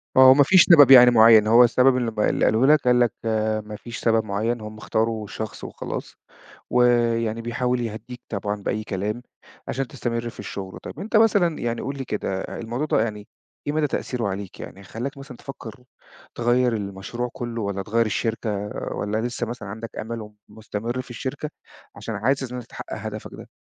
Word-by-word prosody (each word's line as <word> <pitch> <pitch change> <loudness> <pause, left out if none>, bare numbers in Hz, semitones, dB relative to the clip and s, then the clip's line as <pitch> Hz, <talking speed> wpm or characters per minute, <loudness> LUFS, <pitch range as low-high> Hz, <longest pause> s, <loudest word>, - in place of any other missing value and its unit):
آه، 130 0 +9
وما 140 +2 +7
فيش 180 +5 +6
سبب 145 -6 +8
يعني 125 -2 +10
معيّن، 110 -2 +7
هو 115 +3 +7
السبب 125 +2 +4
اللي 120 -2 -1 0.2
اللي - - +1
قاله 110 +4 +3
لك، 155 +1 +6
قال 125 0 +3
لك 120 -2 +3
آآ 110 -1 0
ما 105 0 -9
فيش 115 +2 -8
سبب 115 -1 +2
معيّن، 110 +3 -2
هُم 110 0 -8
اختاروا 110 0 -1
شخص 110 +1 -7
وخلاص. - - -6 0.5
ويعني 115 -2 +2
بيحاول 125 +1 -1
يهدّيك 115 +2 -6
طبعًا 105 0 -2
بأي 110 +2 -2
كلام 105 +3 -3 0.5
عشان 135 +1 -2
تستمر 120 -3 -3
في - - -15
الشغل. 95 -2 -7
طَب - - -8
انت 215 +2 0
مثلًا 200 -7 +3
يعني 120 0 -2
قُل 140 +1 -4
لي 135 - -5
كده، 95 -4 -3
الموضوع 120 +8 -4
ده 145 - +2
يعني 105 -2 -5 0.4
إيه 145 - 0
مدى 155 -1 +1
تأثيره 125 -5 -2
عليك؟ 100 -1 -6
يعني 100 - -9
خلاك 120 +9 -6
مثلًا 135 -2 -10
تفكر 125 -3 -10 0.5
تغير 120 0 +2
المشروع 100 +4 -4
كله، 120 -1 -5
والّا 100 -1 -3
تغير 115 +3 +1
الشركة، 110 -2 -2 0.3
والّا 105 +1 -2
لسه 120 0 -3
مثلًا 115 -3 -7
عندك 110 +3 -7
أمل 110 -1 -6 0.2
ومستمر 110 +3 -5
في 130 - -17
الشركة 130 +5 -5 0.5
عشان 115 - -6
عايز 130 +7 0
إن - - -4
أنت 125 - -7
تحقق - - -8
هدفك - - -7
ده؟ - - -11
115 Hz, 185 wpm, -23 LUFS, 110-125 Hz, 0.5 s, يعني